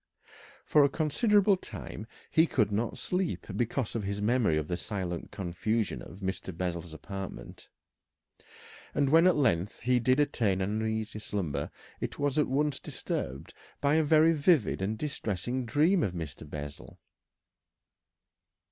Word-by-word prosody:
For 150 - +5
a 140 - +4
considerable 195 - +3
time 110 - -8 0.2
he 160 +1 +5
could 110 -8 +1
not 110 +3 -1
sleep 180 -1 -1
because 120 0 -1
of 115 - -1
his 100 0 -3
memory 105 -6 +2
of 75 -1 -2
the 85 - -1
silent 90 -3 -4
confusion 105 +4 -2
of 95 - -11
Mr. 95 -2 -4
Bessel's 85 -2 -3
apartment, 95 +4 -8 1.3
and 140 -1 +2
when 165 +3 +7
at 185 - +5
length 105 - +1
he 125 0 +3
did 130 +3 +3
attain 110 -9 +2
an 105 +3 -1
uneasy 110 -1 -2
slumber 80 -10 -3 0.3
it - - -4
was 145 +1 +1
at 150 - +3
once 145 +1 0
disturbed 70 +3 -4 0.3
by 140 0 +2
a 160 0 +4
very 155 +2 +5
vivid 150 - +3
and 105 +3 -1
distressing 120 - -3
dream 160 +9 +3
of 95 -10 0
Mr. 80 -3 -7
Bessel. 75 -1 -8
110 Hz, 145 wpm, -30 LUFS, 95-145 Hz, 1.3 s, when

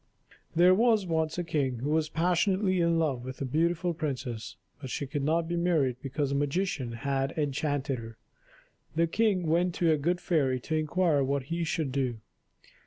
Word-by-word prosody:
There 175 +2 +6
was 220 0 +3
once 160 -2 -1
a 175 - -1
king 145 -7 -1
who 145 +3 -1
was 155 -1 +1
passionately 185 +3 +1
in 170 0 +2
love 140 -7 0
with 130 +1 -7
a 140 - -2
beautiful 170 +5 0
princess, 125 - -4 0.3
but 135 - -6
she 140 - -3
could 140 +2 -3
not 165 +3 +1
be 175 - -2
married 160 -8 +1
because 140 +1 -2
a - - 0
magician 145 -3 -1
had 135 +4 -2
enchanted 145 -2 -1
her. 115 -1 -10 0.8
The 165 +1 +3
king 195 0 +1
went 170 +2 +1
to 170 -2 +2
a 155 - +3
good 175 +5 0
fairy 135 -8 +1
to 160 - -2
inquire 155 -1 +2
what 140 0 0
he 170 0 -1
should 160 -3 -1
do. 130 -3 -1
155 Hz, 180 wpm, -29 LUFS, 135-170 Hz, 0.8 s, There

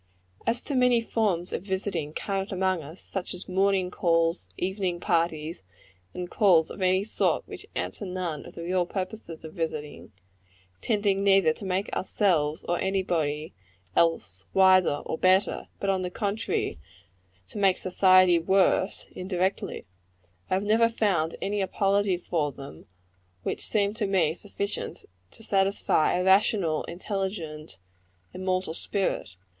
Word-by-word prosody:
As 235 +2 +1
to 290 - -4
many 250 -2 +4
forms 205 -6 -1
of - - -2
visiting 190 -5 -2
current 195 +4 -3
among 185 -2 0
us 155 +5 -10
such 190 -1 -4
as 180 - -10
morning 190 -1 +1
calls, 165 -1 +1
evening 185 -1 -2
parties, 165 -2 -1 0.5
and 180 0 -4
calls 175 -4 +4
of - - -8
any 185 +1 +3
sort 220 - 0
which - - -9
answer - - -3
none 180 -5 -3
of - - -13
the 170 - -6
real 180 0 0
purposes 185 -4 -6
of 160 - -9
visiting 155 -3 -5 0.7
tending 200 -3 +1
neither 195 -5 +5
to 195 - -10
make 190 +1 -1
ourselves 165 -7 +1
or 175 0 0
any 190 0 0
body 155 -3 -2 0.4
else 95 - +1
wiser 185 -6 +5
or 160 - -3
better, 185 +2 +2
but, 195 - +1
on 190 -1 0
the 180 - -2
contrary, 200 - -2 0.7
to - - -7
make 195 -2 +4
society 185 -1 +5
worse, 190 +2 +2
indirectly 185 +1 -2 0.6
I - - +2
have 190 - 0
never 225 +2 +4
found 190 -8 0
any 205 +1 -1
apology 195 0 +1
for 160 -4 -1
them 135 - -11 0.6
which - - -2
seemed 205 -1 +1
to 210 -3 0
me 175 -5 +2
sufficient 200 +2 -5 0.2
to 225 - -13
satisfy 195 -5 +2
a - - 0
rational, 190 -4 +3
intelligent, 175 - -5 0.6
immortal 185 -2 -1
spirit. 190 - -2
185 Hz, 140 wpm, -27 LUFS, 165-200 Hz, 0.7 s, neither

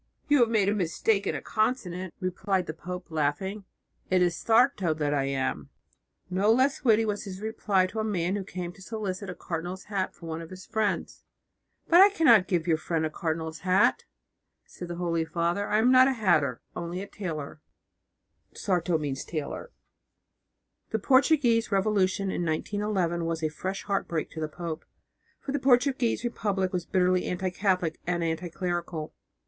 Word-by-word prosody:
"You 290 -1 +4
have 235 -2 +4
made 215 -4 +2
a 205 - +3
mistake 200 +2 0
in - - 0
a - - -5
consonant," 190 -6 -1
replied 185 +1 -1
the 155 - -5
pope, 180 +2 -7
laughing, 160 +7 -1 0.4
"it 185 -1 +4
is 175 -1 +2
a - - -7
'Sarto' 225 - +3
that 150 -1 0
I 140 -2 +1
am." 135 -1 -2 0.6
No 190 +4 +2
less 265 +5 +2
witty 225 -3 +4
was 210 -1 -2
his 190 -1 -7
reply 205 -3 +1
to 205 +4 -5
a - - 0
man 190 -3 0
who 200 - -3
came 180 -2 -5
to 195 - -17
solicit 200 -2 -4
a 180 - -5
cardinal's 175 +3 -5
hat 195 -3 -3
for 170 - -12
one 165 0 -4
of 165 - -9
his 185 0 -10
friends. 215 -2 -2 0.6
"But 345 +2 +7
I 400 - +9
cannot 240 - +5
give 175 -3 0
your 160 -3 +2
friend 160 -1 -1
a 155 - -3
cardinal's 160 -1 -3
hat," 185 +2 +3 0.6
said 175 - -9
the 175 - -5
Holy 170 -1 0
Father. 170 +4 -1
"I 210 - +2
am 235 +4 +4
not 255 0 +7
a 270 - +2
hatter, 155 - +2
only 175 +2 -4
a - - -8
tailor" 155 -7 -6 0.9
(sarto). 175 -3 0
The 150 - -4 1.3
Portuguese 260 -2 +3
revolution 195 -1 +1
in 175 - -2
1911 175 +1 -1
was 165 -1 -2
a 155 - +1
fresh 190 +5 -4
heartbreak 185 -5 -2
to 160 - -6
the 155 - -1
pope, 165 0 -5 0.6
for 275 - -5
the 285 - 0
Portuguese 255 -2 +2
Republic 200 -6 -1
was 175 -2 -2
bitterly 180 -1 +2
anti 180 +1 -2
Catholic 180 -4 0
and 175 -1 0
anti 165 +2 -2
clerical. 175 -3 -3
185 Hz, 175 wpm, -27 LUFS, 170-215 Hz, 1.3 s, I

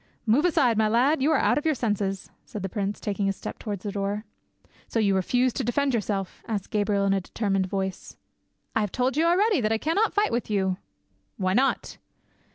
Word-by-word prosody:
"Move 245 +9 +3
aside, 250 -10 +3
my 215 - +4
lad; 255 +7 +3
you 295 +4 +3
are - - +4
out - - +3
of - - -9
your 310 - +2
senses," 205 -5 -2
said 210 - -7
the - - -1
prince, 200 0 -3
taking 200 -1 -1
a - - +2
step 195 - -7
towards 205 -4 -5
the 205 - -3
door. 200 +2 -2 0.6
"So - - -3
you 205 -3 +3
refuse 245 +7 +2
to - - -2
defend 270 +3 +1
yourself?" 205 -4 -2
asked 210 -4 -3
Gabriel 205 -1 +1
in 195 - +3
a 195 - +1
determined 195 -1 -1
voice. 190 0 -4 0.6
"I 220 - +3
have 205 -3 -2
told 255 +2 0
you 315 +2 +2
already 375 - +3
that 215 -1 0
I 225 - +3
cannot 335 - +1
fight 415 +1 +1
with 235 -1 -2
you." 190 -3 0 0.6
"Why 185 -1 0
not?" 265 +6 0
215 Hz, 210 wpm, -26 LUFS, 195-255 Hz, 0.6 s, my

